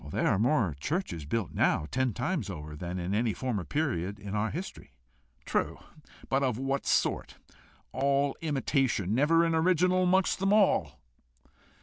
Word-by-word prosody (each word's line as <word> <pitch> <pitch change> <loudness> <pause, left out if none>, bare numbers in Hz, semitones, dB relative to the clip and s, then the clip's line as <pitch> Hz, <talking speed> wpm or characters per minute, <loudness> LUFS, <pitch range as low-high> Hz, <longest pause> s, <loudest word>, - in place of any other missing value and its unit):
"There - - -1
are 95 - +2
more 115 - +2
churches 105 - -3
built 110 +3 -2
now, - - +2
ten 130 -1 +1
times 125 - -2
over, 75 -4 -7
than 90 +4 -5
in 90 +2 -3
any 110 +1 +1
former 120 -8 -2
period 100 - -2
of 100 - -5
our 105 +1 0
history." 175 - -7 0.5
"True; - - -1 0.5
but 135 +1 +1
of 130 -5 0
what 135 +1 -2
sort? - - 0 0.5
All 140 +2 +1
imitation 135 - 0
never 160 +7 +4
an 165 - +1
original 180 +2 +3
amongst 185 +1 +2
them 195 +1 +2
all!" 85 - +2
130 Hz, 150 wpm, -29 LUFS, 100-160 Hz, 0.5 s, never